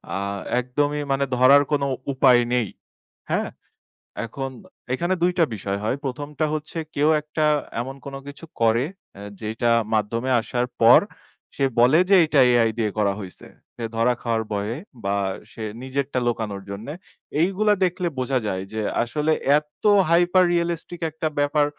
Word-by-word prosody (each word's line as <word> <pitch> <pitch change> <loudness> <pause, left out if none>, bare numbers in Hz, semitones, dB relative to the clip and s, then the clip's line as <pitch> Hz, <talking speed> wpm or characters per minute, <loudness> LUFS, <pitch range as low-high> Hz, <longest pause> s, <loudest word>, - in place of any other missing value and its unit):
আ - - -1 0.4
একদমই 145 +4 -1
মানে 135 0 +1
ধরার 135 +3 +7
কোনো 145 -1 +1 0.3
উপায় 130 -2 +5
নেই। 120 -4 +1 0.6
হ্যাঁ? - - 0 0.8
এখন 135 +4 -5 0.4
এখানে 175 +7 0
২ 180 - +4
টা 165 - +6
বিষয় 100 -1 -3
হয়। 110 - 0
হয় - - -9
১ম 135 +2 -4
টা 155 - +3
হচ্ছে, 155 +2 -5 0.2
কেউ 150 +2 +3
একটা 155 +1 -1 0.4
এমন 135 +3 -6
কোন 140 -1 -6
কিছু 140 +3 -9 0.2
করে, 115 +3 +3 0.3
আ - - -9 0.2
যেটা 110 +2 0 0.2
মাধ্যমে 115 +4 0
আসার 120 +2 -2
পর 115 +1 +8 0.6
সে 140 - +2
বলে 130 +7 +6
যে, 195 - +7
"এটা 150 -2 +2
AI 120 -2 +4
দিয়ে 110 -2 0
করা 100 -2 +2
হইছে।" 95 -2 -11 0.3
সে 120 - -7
ধরা 120 +2 +3
খাওয়ার 115 -2 0
ভয়ে 105 +3 -2 0.3
বা 100 +1 +1 0.4
সে 110 - -7 0.2
নিজেরটা 130 0 -2
লুকানোর 105 -4 -2
জন্যে। 110 +9 -6 0.5
এইগুলা 195 +4 +2
দেখলে 180 0 -1
বোঝা 130 +1 0
যায় 95 -1 -2
যে, 110 - -2 0.2
আসলে 150 +6 -1 0.3
এত 150 0 -27 0.3
হাইপার 175 +2 +4
রিয়ালিস্টিক 170 0 -2
একটা 160 +1 -2
ব্যাপার, 145 +1 +2
130 Hz, 155 wpm, -23 LUFS, 115-150 Hz, 0.8 s, পর